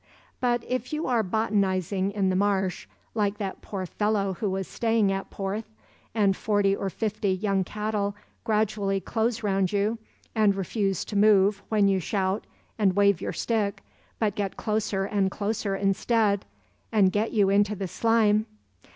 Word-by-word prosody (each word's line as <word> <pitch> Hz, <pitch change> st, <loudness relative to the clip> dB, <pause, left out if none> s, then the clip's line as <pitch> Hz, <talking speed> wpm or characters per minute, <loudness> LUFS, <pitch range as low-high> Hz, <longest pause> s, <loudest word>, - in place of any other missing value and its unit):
But 240 Hz, -1 st, +1 dB
if 255 Hz, 0 st, -2 dB
you 305 Hz, +1 st, -2 dB
are 245 Hz, -3 st, +2 dB
botanizing 195 Hz, -2 st, 0 dB
in 200 Hz, -2 st, 0 dB
the -, -, 0 dB
marsh, 190 Hz, -1 st, 0 dB, 0.3 s
like 205 Hz, -2 st, 0 dB
that 195 Hz, -2 st, -5 dB
poor 190 Hz, -2 st, -5 dB
fellow 205 Hz, +1 st, 0 dB
who 200 Hz, +3 st, -2 dB
was 190 Hz, 0 st, -2 dB
staying 225 Hz, -3 st, +1 dB
at 195 Hz, 0 st, -3 dB
Porth, 205 Hz, +3 st, -4 dB, 0.5 s
and 200 Hz, -3 st, +3 dB
forty 205 Hz, -2 st, +1 dB
or 195 Hz, -, -3 dB
fifty 210 Hz, 0 st, -1 dB
young 195 Hz, 0 st, 0 dB
cattle 210 Hz, 0 st, -2 dB, 0.3 s
gradually 210 Hz, -2 st, 0 dB
close 225 Hz, +3 st, -1 dB
round 195 Hz, -3 st, +1 dB
you, 210 Hz, +3 st, 0 dB, 0.3 s
and 210 Hz, -3 st, +3 dB
refuse 195 Hz, +1 st, -1 dB
to 210 Hz, -, -7 dB
move 200 Hz, -1 st, +4 dB
when 210 Hz, -2 st, +3 dB
you 195 Hz, -1 st, +2 dB
shout 190 Hz, +2 st, -1 dB, 0.3 s
and 195 Hz, -3 st, +3 dB
wave 200 Hz, -3 st, +4 dB
your -, -, -2 dB
stick, 215 Hz, -4 st, -1 dB, 0.3 s
but 215 Hz, -3 st, 0 dB
get 200 Hz, -2 st, -3 dB
closer 210 Hz, -2 st, -1 dB
and 200 Hz, -1 st, +1 dB
closer 205 Hz, 0 st, -2 dB
instead, 200 Hz, +1 st, +1 dB, 0.5 s
and 200 Hz, -4 st, +4 dB
get 210 Hz, +3 st, 0 dB
you 200 Hz, -3 st, +3 dB
into 205 Hz, +1 st, +3 dB
the 195 Hz, -1 st, -4 dB
slime. 220 Hz, +1 st, +2 dB
205 Hz, 160 wpm, -26 LUFS, 195-215 Hz, 0.5 s, move